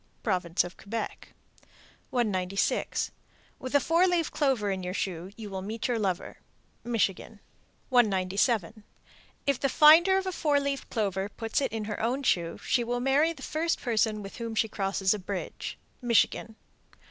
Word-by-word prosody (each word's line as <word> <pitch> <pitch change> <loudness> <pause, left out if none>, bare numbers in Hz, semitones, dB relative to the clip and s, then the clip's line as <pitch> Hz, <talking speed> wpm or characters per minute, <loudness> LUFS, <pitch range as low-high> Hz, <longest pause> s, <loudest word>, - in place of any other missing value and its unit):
Province 180 -5 +1
of 175 0 -9
Quebec. 225 +3 -5 0.8
196. 195 -5 0 0.5
With 255 +2 -4
a - - +7
four 335 +6 +3
leaved 345 -3 +1
clover 255 -8 +1
in 190 -1 -2
your 180 +1 -4
shoe, 180 -2 -3
you 220 -2 -7
will 190 -1 -4
meet 220 +5 -3
your 240 -2 0
lover. 190 -4 -2 0.4
Michigan. 220 -2 -1 0.5
197. 215 -2 +2 0.6
If 280 -3 +1
the 275 - +1
finder 330 +7 +7
of 385 - -1
a 375 - -1
four 300 -5 +2
leaved 280 -1 -3
clover 200 -3 -1
put 225 +4 -2
it 270 - -1
in 225 -1 -3
her 210 -1 -4
own 250 +5 0
shoe, 170 -9 +1
she 240 - +2
will 245 +1 -2
marry 275 +6 +3
the 330 - -10
first 330 +2 -1
person 220 -3 0
with 195 - -9
whom 230 -2 -4
she 225 - +2
crosses 195 -2 0
a 210 - -4
bridge. 190 0 -5 0.3
_Michigan. 230 -1 +2
225 Hz, 160 wpm, -28 LUFS, 195-270 Hz, 0.8 s, a